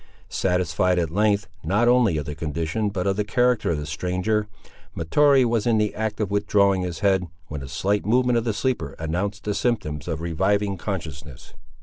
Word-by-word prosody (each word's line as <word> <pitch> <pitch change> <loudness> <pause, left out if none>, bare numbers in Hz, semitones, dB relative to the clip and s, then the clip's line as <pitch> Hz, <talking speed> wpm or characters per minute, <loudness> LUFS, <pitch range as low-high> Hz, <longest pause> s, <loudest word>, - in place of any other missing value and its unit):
Satisfied 90 0 +1
at 85 -3 0
length, 105 +1 +1 0.2
not 100 +9 +2
only 120 -9 +4
of 75 - -3
the 75 - -5
condition 80 +7 -2
but 95 -3 -3
of 100 0 +1
the 105 - +1
character 120 +1 +1
of 85 - 0
the 75 - -4
stranger, 90 +7 -1 0.5
Mahtoree 135 - +4
was 115 -1 0
in 115 -2 +3
the 105 -1 +1
act 110 -1 -3
of 105 -3 -1
withdrawing 100 -1 +2
his 90 -1 -4
head, 95 -3 +2 0.2
when 75 -2 -5
a 70 - -7
slight 100 +9 0
movement 125 +2 +3
of - - -4
the 115 - 0
sleeper 110 - -2
announced 90 +6 -3
the 105 - -1
symptoms 75 - -2
of 80 -3 -2
reviving 95 +5 0
consciousness. 80 - -6
100 Hz, 190 wpm, -24 LUFS, 85-110 Hz, 0.5 s, only